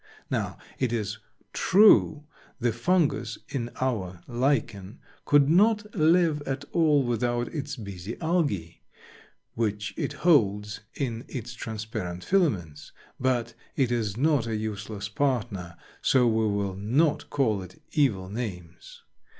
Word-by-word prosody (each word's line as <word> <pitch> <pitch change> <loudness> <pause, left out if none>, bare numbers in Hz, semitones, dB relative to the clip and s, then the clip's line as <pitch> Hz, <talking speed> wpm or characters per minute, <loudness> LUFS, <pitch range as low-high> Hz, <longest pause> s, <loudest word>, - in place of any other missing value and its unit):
Now, - - -2 0.2
it 130 -3 +1
is 110 -2 -2 0.3
true 185 -6 +5 0.4
the 120 -2 +1
Fungus 125 -3 +1
in 125 -4 -3
our 95 -9 -2
Lichen 120 -5 -1 0.3
could 145 -1 +5
not 210 +5 +3
live 160 -2 +3
at 135 +1 -3
all 155 -4 +3
without 120 0 -1
its 145 -2 -4
busy 100 -2 -7
Algae, 145 - -1 0.7
which 105 -2 -2
it - - -2
holds 105 - +3 0.2
in 120 -4 -3
its 120 -2 -6
transparent 110 -6 -5
filaments, 100 - 0 0.3
but 120 -3 0 0.2
it 130 -4 +1
is 110 -4 -1
not 140 -3 +2
a 115 - -1
useless 105 -1 -4
partner, 110 -8 -2 0.2
so 130 -2 +4
we 110 -1 +2
will 100 -2 -1
not 130 - +1
call 110 -8 +1
it 95 0 -12
evil 115 -12 +1
names. 95 -5 -7
120 Hz, 125 wpm, -27 LUFS, 105-145 Hz, 0.7 s, true